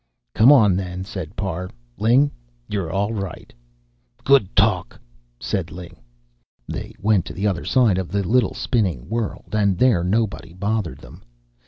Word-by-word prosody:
"Come 115 Hz, +6 st, +6 dB
on, 105 Hz, -10 st, +6 dB
then," 90 Hz, -1 st, -4 dB
said 95 Hz, -2 st, -7 dB
Parr. 90 Hz, -2 st, -3 dB, 0.3 s
"Ling, 130 Hz, +7 st, +4 dB, 0.4 s
you're 95 Hz, -5 st, -3 dB
all 100 Hz, +3 st, -1 dB
right." 100 Hz, -5 st, -6 dB, 0.7 s
"Good 135 Hz, -9 st, +3 dB
talk!" -, -, +1 dB, 0.4 s
said 85 Hz, -4 st, -2 dB
Ling. 90 Hz, +2 st, -10 dB, 0.7 s
They -, -, -6 dB
went 105 Hz, -3 st, +2 dB
to -, -, -7 dB
the 95 Hz, +5 st, -3 dB
other 95 Hz, -4 st, 0 dB
side 115 Hz, -8 st, +3 dB
of 95 Hz, -, -3 dB
the 100 Hz, 0 st, -1 dB
little 120 Hz, -1 st, +2 dB
spinning 95 Hz, -, -1 dB
world, 115 Hz, -2 st, -4 dB
and 100 Hz, -3 st, +2 dB
there 115 Hz, -8 st, +3 dB
nobody 100 Hz, -2 st, -1 dB
bothered 100 Hz, -6 st, -2 dB
them. -, -, -14 dB
100 Hz, 150 wpm, -22 LUFS, 90-110 Hz, 0.7 s, Come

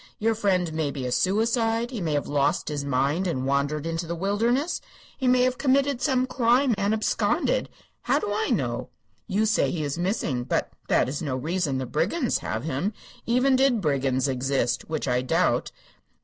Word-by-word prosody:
Your 225 Hz, +1 st, +1 dB
friend 185 Hz, -6 st, 0 dB
may 155 Hz, -2 st, -1 dB
be 135 Hz, -2 st, -5 dB
a 125 Hz, -, -2 dB
suicide; 225 Hz, -, +1 dB
he 230 Hz, -6 st, -4 dB
may 160 Hz, -3 st, -1 dB
have 145 Hz, -, -1 dB
lost 145 Hz, +1 st, +1 dB
his 145 Hz, -2 st, -3 dB
mind 140 Hz, +7 st, 0 dB
and 130 Hz, -7 st, -2 dB
wandered 140 Hz, +2 st, 0 dB
into 165 Hz, 0 st, -3 dB
the 170 Hz, -, -3 dB
wilderness; 230 Hz, -, 0 dB, 0.3 s
he 260 Hz, -, -2 dB
may 250 Hz, 0 st, +4 dB
have 255 Hz, 0 st, 0 dB
committed 275 Hz, -1 st, +2 dB
some 260 Hz, -3 st, +2 dB
crime 255 Hz, 0 st, +2 dB
and 200 Hz, 0 st, 0 dB
absconded. 220 Hz, 0 st, +1 dB, 0.3 s
How -, -, +2 dB
do 420 Hz, -, -2 dB
I 440 Hz, -, -1 dB
know? -, -, -1 dB, 0.4 s
You 215 Hz, +1 st, +1 dB
say 215 Hz, 0 st, +2 dB
he 160 Hz, -3 st, -2 dB
is 145 Hz, +3 st, -3 dB
missing, 175 Hz, -, -1 dB
but -, -, -1 dB, 0.2 s
that -, -, +3 dB
is 140 Hz, +3 st, -4 dB
no 140 Hz, -5 st, -2 dB
reason 155 Hz, +1 st, -1 dB
the 130 Hz, -, -2 dB
brigands 205 Hz, -, 0 dB
have -, -, -4 dB
him, 160 Hz, +7 st, -2 dB, 0.3 s
even 255 Hz, +3 st, +3 dB
did 260 Hz, -3 st, +3 dB
brigands 140 Hz, -5 st, +1 dB
exist, 130 Hz, -1 st, -1 dB
which 155 Hz, -3 st, -2 dB
I 125 Hz, 0 st, +1 dB
doubt. 130 Hz, -, +1 dB
180 Hz, 185 wpm, -25 LUFS, 140-235 Hz, 0.4 s, may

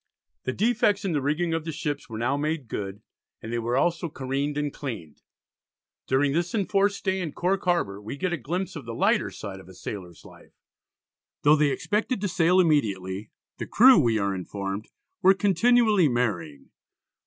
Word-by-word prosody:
The 130 Hz, -, 0 dB
defects 210 Hz, -, +1 dB
in 190 Hz, -, 0 dB
the 150 Hz, -3 st, 0 dB
rigging 160 Hz, +5 st, 0 dB
of 165 Hz, -1 st, -1 dB
the 160 Hz, -, -4 dB
ships 150 Hz, -1 st, -4 dB
were 110 Hz, -, -6 dB
now 120 Hz, +5 st, 0 dB
made 150 Hz, -2 st, -2 dB
good, 100 Hz, 0 st, -5 dB, 0.4 s
and 115 Hz, -, -7 dB
they 120 Hz, -, 0 dB
were 120 Hz, +2 st, -1 dB
also 170 Hz, +3 st, +1 dB
careened 140 Hz, +1 st, -3 dB
and 145 Hz, -1 st, -2 dB
cleaned. 110 Hz, -, -7 dB, 0.9 s
During 135 Hz, +1 st, +2 dB
this 170 Hz, +5 st, -1 dB
enforced 200 Hz, -1 st, +1 dB
stay 190 Hz, -1 st, -1 dB
in 160 Hz, -5 st, -4 dB
Cork 190 Hz, +2 st, 0 dB
Harbour, 105 Hz, -, 0 dB
we 110 Hz, +7 st, -7 dB
get 185 Hz, +3 st, -1 dB
a -, -, 0 dB
glimpse 175 Hz, +8 st, -3 dB
of 150 Hz, -, -7 dB
the 115 Hz, 0 st, -6 dB
lighter -, -, +2 dB
side 95 Hz, -1 st, -8 dB
of 95 Hz, -, -14 dB
a 95 Hz, -, -13 dB
sailor's 90 Hz, -2 st, -8 dB
life. -, -, -16 dB, 0.9 s
Though 150 Hz, +1 st, +6 dB
they 150 Hz, -1 st, +3 dB
expected 210 Hz, -, -1 dB
to 205 Hz, -, 0 dB
sail 180 Hz, 0 st, +3 dB
immediately, 105 Hz, -, +1 dB, 0.3 s
the -, -, -4 dB
crew 255 Hz, -2 st, +7 dB
we 115 Hz, -6 st, +2 dB
are 100 Hz, -2 st, 0 dB
informed 95 Hz, +2 st, -5 dB, 0.3 s
"were 190 Hz, +1 st, +6 dB
continually 205 Hz, -1 st, +4 dB
marrying." 90 Hz, -, -2 dB
145 Hz, 180 wpm, -26 LUFS, 110-180 Hz, 0.9 s, crew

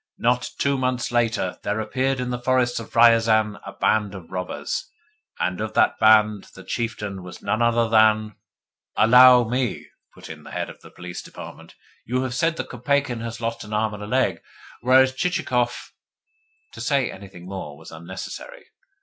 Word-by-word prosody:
Not 125 Hz, +1 st, +1 dB
two 140 Hz, -1 st, +1 dB
months 125 Hz, -1 st, -1 dB
later 115 Hz, -6 st, 0 dB
there 105 Hz, +2 st, -2 dB
appeared 130 Hz, +4 st, -1 dB
in 125 Hz, 0 st, -3 dB
the 125 Hz, -, -3 dB
forests 125 Hz, -1 st, +1 dB
of 115 Hz, -, -11 dB
Riazan 115 Hz, -2 st, +4 dB
a -, -, -8 dB
band 105 Hz, -2 st, 0 dB
of 90 Hz, -4 st, -11 dB
robbers: 95 Hz, -, -4 dB, 0.5 s
and 90 Hz, +2 st, -1 dB
of 110 Hz, 0 st, -4 dB
that -, -, +3 dB
band 110 Hz, -2 st, +4 dB
the 95 Hz, -, -11 dB
chieftain 105 Hz, -3 st, -4 dB
was 90 Hz, 0 st, -11 dB
none 110 Hz, -, 0 dB
other 115 Hz, 0 st, +3 dB
than 110 Hz, -1 st, +3 dB, 0.3 s
" -, -, -34 dB
"Allow 125 Hz, +1 st, +8 dB
me," 125 Hz, +2 st, -2 dB, 0.3 s
put -, -, -12 dB
in -, -, -9 dB
the -, -, -13 dB
Head -, -, -4 dB
of -, -, -17 dB
the -, -, -14 dB
Police 90 Hz, -1 st, -8 dB
Department. -, -, -11 dB, 0.3 s
"You 130 Hz, +3 st, -1 dB
have 130 Hz, -1 st, -3 dB
said 165 Hz, +6 st, +1 dB
that -, -, -5 dB
Kopeikin 130 Hz, -1 st, -1 dB
had 115 Hz, 0 st, -6 dB
lost 115 Hz, 0 st, -3 dB
an 105 Hz, 0 st, -9 dB
arm 110 Hz, 0 st, 0 dB
and 105 Hz, -, -8 dB
a 105 Hz, -, -6 dB
leg; 110 Hz, -8 st, 0 dB, 0.4 s
whereas 130 Hz, +1 st, +5 dB
Chichikov 130 Hz, -6 st, -1 dB, 0.4 s
" 440 Hz, 0 st, -42 dB
To -, -, -9 dB
say 140 Hz, -4 st, +1 dB
anything 95 Hz, -2 st, -12 dB
more 90 Hz, -6 st, -7 dB
was 80 Hz, -, -13 dB
unnecessary. 85 Hz, +4 st, -9 dB
115 Hz, 180 wpm, -23 LUFS, 105-125 Hz, 0.5 s, Allow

